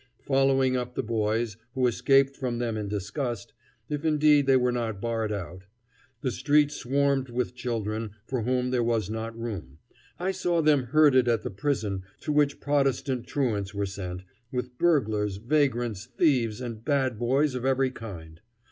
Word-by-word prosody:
Following 135 -1 +3
up 125 -1 -3
the - - -1
boys, 110 0 -1 0.2
who 130 -1 +2
escaped 135 +3 +3
from 125 -3 -3
them 120 -2 -1
in 105 -1 -3
disgust 105 +3 -4 0.3
if 150 0 -3
indeed 150 -2 +4
they 135 -1 +6
were 125 -1 +2
not 115 -4 -2
barred 115 -1 -1
out; 90 -2 -6 0.6
the 130 - -1
street 145 +2 +3
swarmed 140 -1 0
with 125 +1 -2
children 110 -3 -3
for 130 -3 -2
whom 125 +2 0
there 125 -1 +2
was 115 -4 0
not 115 +1 -4
room 95 - -6 0.4
I 185 +2 0
saw 175 -2 0
them 145 -4 +4
herded 130 -1 +5
at 115 -2 +2
the - - -4
prison 100 -3 -1 0.2
to 150 - -2
which 145 -1 +2
Protestant 135 -3 0
truants 105 -8 -1
were 100 0 0
sent, 95 -2 -6 0.3
with 125 -1 -4
burglars, 110 - +2
vagrants, 120 -4 0
thieves, 125 -4 +1
and 115 -3 -6
"bad 130 -5 0
boys" 135 +4 +2
of 125 -1 -4
every 135 0 +2
kind. 85 -10 -9
125 Hz, 165 wpm, -27 LUFS, 110-135 Hz, 0.6 s, they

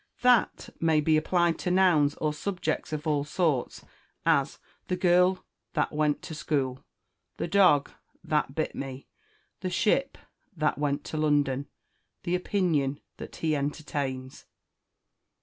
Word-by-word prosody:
That 245 -2 +3
may 160 -2 +3
be 155 +1 +3
applied 170 +2 +2
to 180 - -2
nouns 175 -6 +4
or 155 -1 -1
subjects 175 -2 -3
of 150 -1 -4
all 150 -2 +1
sorts; 150 -3 -1 0.4
as, 155 -4 +2 0.3
the 180 - 0
girl 180 +1 +3 0.3
that - - 0
went 150 -1 0
to - - -7
school, 135 -4 -2 0.5
the - - -2
dog 180 -7 +4 0.3
that 150 -4 -1
bit 155 - -1
me, 135 0 -6 0.5
the 185 - -3
ship 230 +9 +1 0.4
that 150 -2 0
went 145 -1 -1
to 155 - -5
London, 145 -3 +1 0.6
the 175 - -2
opinion 170 -7 0 0.2
that - - -9
he 155 -2 0
entertains. 140 -3 -4
155 Hz, 130 wpm, -28 LUFS, 145-175 Hz, 0.6 s, nouns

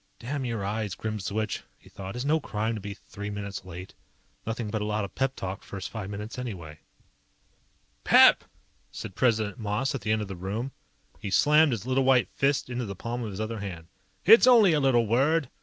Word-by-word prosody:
Damn 135 +3 -4
your 115 -5 -3
eyes, 105 -1 -2
Grimswitch, 110 0 -3 0.2
he - - -21
thought. 95 +1 -8
It's 125 +2 -3
no 155 +2 +3
crime 110 -4 -2
to 110 - -5
be 100 0 -6
three 105 +1 -8
minutes 100 -2 -6
late. 90 +1 -9 0.5
Nothing 115 -1 -3
but 110 -1 -2
a - - -1
lot 105 -1 -1
of 100 - -11
pep 135 0 -1
talk 95 +1 -5
first 100 -2 -7
five 105 -4 -5
minutes 105 +4 -6
anyway. 85 -11 -7 1.2
"PEP!" - - +7 0.5
said - - -7
President 110 -3 +1
Moss 110 +5 -1
at 135 - -4
the 105 - -1
end 110 0 +1
of - - -7
the 95 - -6
room. 105 +9 -4 0.5
He 100 - -5
slammed 150 - +5
his 115 -3 -3
little 130 +1 +1
white 130 -2 +4
fist 140 +1 +1
into 125 -2 -3
the 100 - -5
palm 120 +5 -4
of 110 - -4
his 100 0 -7
other 110 0 -3
hand. 90 -5 -7 0.4
"It's 225 +5 +8
only 225 -8 +7
a 150 - +3
little 130 -4 +3
word. 135 +6 +2
110 Hz, 205 wpm, -27 LUFS, 100-130 Hz, 1.2 s, It's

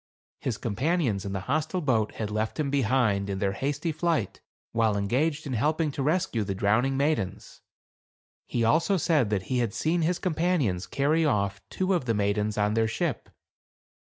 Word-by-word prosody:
His - - -2
com 100 - -4
panions 125 - 0
in 100 - -4
the 95 - -2
hostile 155 - -1
boat 115 -9 +1
had 105 -2 -4
left 110 +6 -2
him, 140 -3 0
behind, 120 -7 +1
in 95 - -2
their 95 0 0
hasty 145 - -2
flight, 155 - -1 0.3
while 110 -3 +2
engaged 145 +10 0
in 135 - -3
helping 150 +6 +1
to 140 - -4
rescue 155 - +1
the 100 -1 -3
drowning 110 +8 +2
maidens; 140 -9 -2 0.9
he 120 - -1
also 165 - +3
said 155 - +2
that 100 -3 0
he 125 +3 -1
had 115 -4 -1
seen 170 +2 +1
his 170 +2 +1
companions 160 - 0
carry 150 +4 +1
off 100 -8 0
two 190 +1 0
of 170 -8 0
the 115 -2 +1
maidens 105 +1 0
to 105 0 +1
their 110 0 +2
ship. 145 - -2
130 Hz, 180 wpm, -27 LUFS, 105-155 Hz, 0.9 s, also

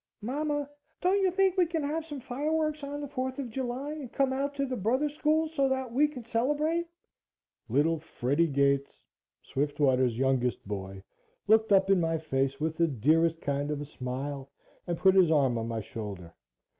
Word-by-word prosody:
"MAMA, 290 +4 -1 0.3
don't 375 +3 +2
you 380 - +4
think 380 +1 +2
you 360 -2 +4
can 325 -2 -2
have 315 +3 -2
some 290 -4 -6
fireworks 305 +4 -1
on 285 +1 -5
the 290 - -4
Fourth 260 -1 -3
of 260 -5 -5
July 260 +3 -3
and 295 -6 -7
come 270 -1 +1
out 280 +1 -2
to 275 0 0
the 260 -1 -3
Brothers 255 +8 0
School 310 +1 +2
so 275 -4 +1
that 260 -2 -2
we 290 +4 +4
can 255 -6 -9
celebrate?" 295 +9 0 0.8
Little 150 +7 +2
Freddie 150 +1 0
Gates, 140 -1 0 0.4
Swiftwater's 130 -4 +1
youngest 125 -5 0
boy, 95 -1 -6 0.4
looked 220 0 +4
up 195 0 +5
in 195 - +5
my 165 0 +1
face 135 -3 -1
with 160 +1 -2
the 170 - +3
dearest 160 +5 +2
kind 140 0 -1
of 150 -1 -2
a 145 - -5
smile, 135 +1 -5 0.4
and 170 -1 -1
put 190 +2 +5
his 185 -4 +5
arm 140 -6 +3
on 115 - -3
my 115 -1 -3
shoulder. 100 -5 -7
195 Hz, 180 wpm, -29 LUFS, -, 0.8 s, up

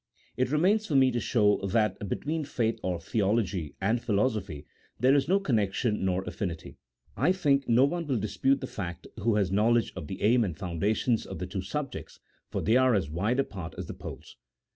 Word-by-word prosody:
It 130 0 0
remains 200 +8 +2
for 150 - -1
me 130 -1 +5
to 120 - -1
show 105 -4 +3
that 100 0 0
between 155 +7 -2
faith 115 -5 -1
or 90 -2 -2
theology, 95 -5 -1
and 110 +5 +1
philosophy, 100 - -1 0.3
there 130 +4 +4
is 140 -1 +2
no 195 +4 +3
connection, 110 - 0
nor 95 0 0
affinity. 85 -5 -5 0.4
I 145 +8 +3
think 145 -7 +1
no 120 +3 +6
one 170 +2 -2
will 135 -4 +1
dispute 110 +6 +1
the - - -3
fact 85 -4 -6
who 110 +1 +1
has 100 -4 +1
knowledge 115 +4 +2
of 90 -5 -6
the 95 - -6
aim 120 +3 +4
and 90 -6 -3
foundations 105 +6 0
of 95 - -6
the 90 - -4
two 95 +1 -4
subjects, 145 +7 -5 0.3
for - - -3
they 115 +4 +4
are 130 -2 +4
as 85 -8 -1
wide 105 - 0
apart 95 -11 -4
as - - -4
the - - -7
poles. - - -10
110 Hz, 195 wpm, -28 LUFS, 95-130 Hz, 0.4 s, no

